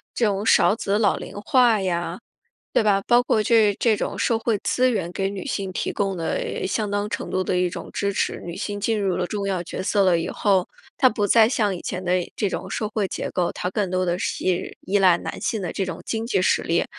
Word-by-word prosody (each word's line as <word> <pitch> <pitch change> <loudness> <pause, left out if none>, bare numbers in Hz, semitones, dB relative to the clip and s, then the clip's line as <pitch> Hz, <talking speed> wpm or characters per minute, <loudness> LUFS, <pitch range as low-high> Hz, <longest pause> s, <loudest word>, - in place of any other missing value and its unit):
这 235 - +2
种 200 -1 0
少 215 - +5
子 205 -2 -1
老 205 -3 +3
龄 - - -9
化 245 -5 +4
呀， 175 -2 -2 0.6
对 - - +4
吧？ 205 -2 +3
包 240 0 +5
括 220 -3 +1
这 215 -2 +4
这 225 -3 +3
种 - - -3
社 230 - +1
会 225 -2 0
资 255 0 +2
源 185 -7 -2
给 195 +2 -2
女 200 -2 -6
性 195 -2 -3
提 - - -2
供 195 -2 -1
了 165 +2 -2
相 210 +1 -1
当 205 +1 -1
程 - - -4
度 185 - 0
的 180 - -1
一 180 0 +1
种 - - -7
支 200 0 0
持。 195 - -2
女 170 -1 -6
性 205 -1 -4
进 215 +1 0
入 195 -2 0
了 180 - -1
重 200 +1 -3
要 185 -3 -1
角 180 - -5
色 200 +1 +2
了 175 -2 +4
以 - - -3
后， 195 -3 +1 0.3
她 265 - +6
不 210 -3 -1
再 220 +1 +5
像 210 -6 +1
以 175 - -7
前 185 0 -5
那 180 0 0
这 205 - 0
种 - - -4
社 215 - -2
会 210 -3 -1
结 - - -4
构， 175 -1 0
她 180 - -3
更 195 -1 -1
多 185 0 0
的 175 0 -1
是 185 -1 -2
依 200 +2 +1
赖 185 -3 +5
男 - - -6
性 215 -4 -2
的 175 - -3
这 195 - -2
种 185 - -6
经 225 0 -3
济 190 -6 +1
实 - - +3
力 170 +1 0
200 Hz, 265 characters per minute, -23 LUFS, 185-215 Hz, 0.6 s, 她